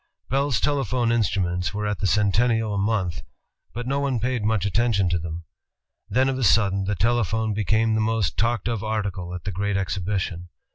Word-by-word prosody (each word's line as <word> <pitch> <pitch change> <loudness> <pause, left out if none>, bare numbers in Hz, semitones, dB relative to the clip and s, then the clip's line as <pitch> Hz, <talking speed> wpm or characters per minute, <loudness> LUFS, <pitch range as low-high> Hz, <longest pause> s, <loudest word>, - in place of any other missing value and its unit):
Bell's 135 -3 +1
telephone 130 -4 +1
instruments 95 -4 0
were 105 0 -2
at 105 -1 -2
the 100 - +1
Centennial 110 +2 +2
a - - -1
month, 100 -6 0 0.5
but 120 +2 -5
no 135 +2 0
one 135 -4 0
paid 125 -1 -1
much 105 -2 +1
attention 100 -2 +2
to 85 0 0
them. 85 +1 -6 0.7
Then 130 +5 +2
of 135 -1 -1
a - - -1
sudden 100 -2 +3
the 105 +1 -1
telephone 110 +1 +1
became 110 +2 +1
the 110 - +1
most 110 -4 0
talked 115 -1 0
of 115 -3 -2
article 100 -5 -3
at 90 - -7
the 100 - -3
great 100 +2 -1
exhibition. 95 -2 -2
105 Hz, 185 wpm, -24 LUFS, 95-115 Hz, 0.7 s, sudden